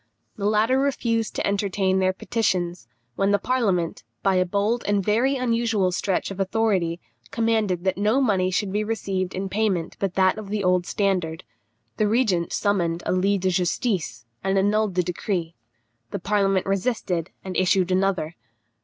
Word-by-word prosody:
The 200 -1 -1
latter 220 +5 +3
refused 235 -5 0
to - - -1
entertain 195 -1 +1
their 185 0 +3
petitions, 180 - -1 0.3
when 195 0 +1
the 205 - +4
parliament, 200 -10 0 0.2
by 195 - +3
a 185 0 +2
bold 210 +5 0
and 205 -2 +1
very 240 +6 +2
unusual 230 -6 +1
stretch 190 +1 -1
of 195 - -7
authority, 190 -4 +1 0.3
commanded 220 -6 0
that 190 0 0
no 215 +6 +3
money 195 -8 +2
should 190 +1 -1
be 210 +1 +1
received 195 -4 -2
in 190 +1 -2
payment 190 -4 -1
but 195 -2 -2
that 190 +2 +3
of 205 -2 -8
the 205 -1 -1
old 180 -1 +2
standard. 180 -5 -1 0.5
The 215 - +2
regent 205 -7 +1
summoned 175 -5 0
a - - 0
lit 190 +1 +1
de 185 0 +1
justice, 175 - -1 0.2
and 195 0 +1
annulled 205 0 +2
the 180 - +2
decree. 175 -1 -3 0.6
The - - -3
parliament 195 0 +1
resisted, 195 -4 -1 0.2
and 185 -1 -5
issued 185 0 +2
another. 185 -4 0
195 Hz, 160 wpm, -24 LUFS, 185-215 Hz, 0.6 s, the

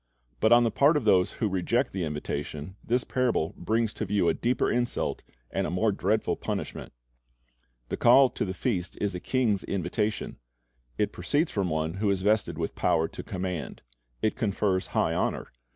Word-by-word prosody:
But 110 - +3
on 120 0 +7
the 115 - +1
part 145 +6 +4
of 135 - -2
those 90 -4 +4
who 110 - -1
reject 105 +7 0
the 95 -3 -1
invitation, 75 +2 -5
this 125 +2 +1
parable 120 -11 0
brings 110 +4 0
to 110 - -3
view 95 -3 +2
a - - +3
deeper 125 +2 0
insult 120 0 -1 0.3
and - - -1
a - - -3
more 105 +5 +1
dreadful 100 +3 0
punishment. - - -4 1.0
The - - -2
call 130 +1 +6
to - - -2
the 95 -1 -3
feast 95 -5 -2
is 100 -1 -1
a 90 - -4
king's 110 -3 0
invitation. 100 +3 -2 0.6
It - - 0
proceeds 150 +3 0
from 95 -3 -1
one 80 +2 -2
who 105 - +2
is 95 -1 0
vested 105 +1 +1
with - - -2
power 80 0 +1
to - - -7
command. 90 -5 -5 0.4
It 110 - +2
confers 100 -4 0
high - - +2
honor. - - -2
105 Hz, 180 wpm, -27 LUFS, 90-115 Hz, 1.0 s, on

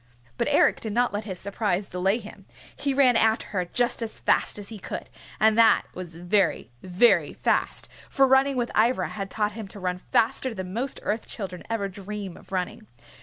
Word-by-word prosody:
But - - -1
Eric - - +3
did 220 -2 -4
not 245 0 +2
let 205 +1 -3
his 190 -4 -5
surprise 200 -1 -1
delay 190 +4 +1
him. - - -12 0.3
He 280 - -1
ran 265 -3 +4
after 220 0 +2
her 185 -3 -1
just 240 +7 0
as 225 -1 -4
fast - - +1
as 205 -1 -6
he 220 -2 -7
could, - - -7 0.3
and 220 0 +4
that 225 -1 +6
was 175 -3 -8
very, 175 -3 0
very 185 +6 +3
fast, - - 0 0.2
for 275 - +4
running 265 +1 +4
with 240 -1 -1
Ivra 235 +4 +2
had 195 -2 -5
taught 210 -1 -1
him 215 -1 -7
to 200 - -11
run 180 -1 -2
faster 230 +5 +1
than 185 -1 -6
most 255 +5 -3
Earth 215 +2 -2
Children 185 -5 -6
ever 225 -3 -1
dream 200 -1 -7
of - - -17
running. 200 +4 -3
210 Hz, 195 wpm, -26 LUFS, 190-230 Hz, 0.3 s, that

